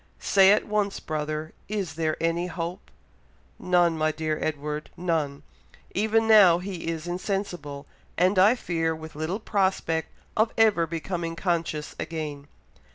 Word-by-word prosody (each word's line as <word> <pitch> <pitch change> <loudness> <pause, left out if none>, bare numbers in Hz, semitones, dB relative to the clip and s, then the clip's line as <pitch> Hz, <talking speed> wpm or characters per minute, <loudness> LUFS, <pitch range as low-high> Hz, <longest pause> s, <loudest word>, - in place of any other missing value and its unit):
Say 195 -1 +5
at 210 - +3
once, 210 -2 0
brother, 155 0 -4 0.2
is 200 -6 -2
there 155 0 -1
any 165 +2 0
hope?" 175 0 -5 0.7
"None, 175 -2 +3
my 155 0 +1
dear 155 0 -2
Edward! 150 0 -3
None! 160 -5 -1 0.5
Even 220 +2 +2
now 200 -6 +7
he 180 -2 -6
is 165 -1 -3
insensible, 175 -6 -4 0.3
and 185 +2 +3
I 205 +6 +6
fear 165 -7 -1
with 160 0 -10
little 155 +7 -3
prospect 190 -6 0 0.3
of 220 +1 +2
ever 210 -7 +4
becoming 165 +1 -3
conscious 165 -4 -2
again." 150 -3 -5
170 Hz, 135 wpm, -26 LUFS, 155-195 Hz, 0.7 s, now